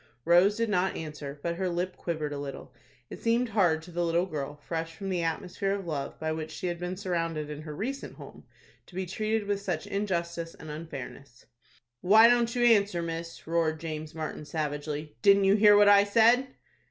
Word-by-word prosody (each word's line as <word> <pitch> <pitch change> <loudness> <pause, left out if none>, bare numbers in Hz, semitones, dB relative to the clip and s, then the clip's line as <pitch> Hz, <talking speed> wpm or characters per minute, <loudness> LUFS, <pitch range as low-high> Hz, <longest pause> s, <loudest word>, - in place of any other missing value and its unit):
Rose 180 +5 +5
did 230 0 +1
not 190 -1 +1
answer, 150 -2 -7
but 170 0 -2
her 190 0 -1
lip 175 +2 -2
quivered 155 -3 -3
a 145 - -4
little. 140 -1 -7 0.4
It - - -8
seemed 235 +1 +1
hard 175 -7 +2
to 175 - -12
the 175 +1 -1
little 170 +1 +1
girl, 145 -5 -5
fresh 165 +2 -5
from 195 +4 -5
the 180 -2 0
atmosphere 180 +4 -2
of 200 -2 -4
love 150 -5 -4
by 160 0 -2
which 155 0 -4
she - - -7
had 175 -1 -2
been 180 +1 -4
surrounded 165 -5 -2
in 150 0 -7
her 150 -1 -7
recent 270 - -5
home, - - -12 0.4
to 175 - -16
be 190 0 -2
treated 215 +3 -1
with 200 -1 -1
such 180 -5 -3
injustice 170 -4 -3
and 155 - -9
unfairness. 140 -5 -9 0.6
"Why 220 +5 +7
don't 235 0 +2
you 245 - +1
answer, 200 -6 +3
miss?" 165 0 -6
roared 160 -1 0
James 155 -1 -6
Martin, 155 -1 -5
savagely. 150 -2 -4
"Didn't 200 +4 +6
you 195 0 +5
hear 210 0 +6
what 205 0 +6
I 200 0 +7
said?" 230 +5 +4
170 Hz, 200 wpm, -28 LUFS, 155-200 Hz, 0.6 s, Why